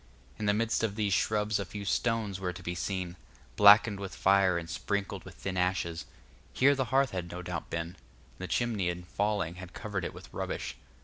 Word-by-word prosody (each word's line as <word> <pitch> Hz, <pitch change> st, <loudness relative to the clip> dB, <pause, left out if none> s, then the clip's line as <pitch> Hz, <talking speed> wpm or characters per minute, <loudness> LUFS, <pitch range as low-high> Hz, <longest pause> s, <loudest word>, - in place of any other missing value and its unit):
In 105 Hz, -, -1 dB
the 105 Hz, -, +4 dB
midst 115 Hz, +1 st, +1 dB
of 105 Hz, -3 st, 0 dB
these 105 Hz, -3 st, +1 dB
shrubs 105 Hz, +1 st, +1 dB
a -, -, 0 dB
few 100 Hz, +2 st, -7 dB
stones 110 Hz, -2 st, 0 dB
were 90 Hz, -2 st, -2 dB
to 95 Hz, +2 st, -10 dB
be 85 Hz, -, -2 dB
seen, 90 Hz, 0 st, -3 dB, 0.4 s
blackened 105 Hz, 0 st, +7 dB
with 100 Hz, -1 st, -6 dB
fire 95 Hz, -2 st, +4 dB
and 85 Hz, -1 st, -4 dB
sprinkled 100 Hz, +3 st, -2 dB
with -, -, -11 dB
thin 95 Hz, -1 st, -4 dB
ashes; 90 Hz, -2 st, 0 dB, 0.5 s
here 140 Hz, +2 st, +5 dB
the 130 Hz, -2 st, 0 dB
hearth 135 Hz, +1 st, +2 dB
had 90 Hz, -2 st, -4 dB
no 90 Hz, +1 st, -6 dB
doubt 85 Hz, -1 st, -5 dB
been, 80 Hz, 0 st, -2 dB
and -, -, -18 dB, 0.4 s
the 95 Hz, -, -4 dB
chimney 110 Hz, -7 st, 0 dB
in 90 Hz, 0 st, -4 dB
falling 100 Hz, -2 st, -1 dB
had 90 Hz, -1 st, -10 dB
covered 105 Hz, -5 st, -4 dB
it -, -, -4 dB
with -, -, -10 dB
rubbish. -, -, -3 dB
100 Hz, 205 wpm, -30 LUFS, 90-105 Hz, 0.5 s, blackened